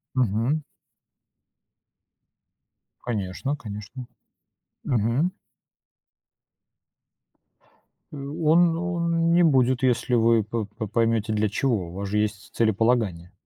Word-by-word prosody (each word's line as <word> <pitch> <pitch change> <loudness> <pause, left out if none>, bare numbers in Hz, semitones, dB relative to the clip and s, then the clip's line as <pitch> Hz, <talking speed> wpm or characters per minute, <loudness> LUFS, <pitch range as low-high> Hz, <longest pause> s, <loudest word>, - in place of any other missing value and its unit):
Мгм. 125 +5 +1 2.4
Конечно, 115 +4 -3
конечно. 105 +2 -8 0.8
Мгм. 125 - +1 2.8
Э. 145 - -8
Он 160 +4 +2
он 170 -1 0
не 175 0 +5
будет, 130 -4 +3
если 125 0 +1
вы 115 -2 +4
по 110 +1 -3
по 105 +1 -7
поймете 115 0 0
для 105 -1 +1
чего. 105 -5 -1
У - - -10
вас 100 +1 -4
же 105 - -1
есть 105 -1 -2
целеполагание. 110 -5 +1
115 Hz, 95 wpm, -24 LUFS, 105-140 Hz, 2.8 s, не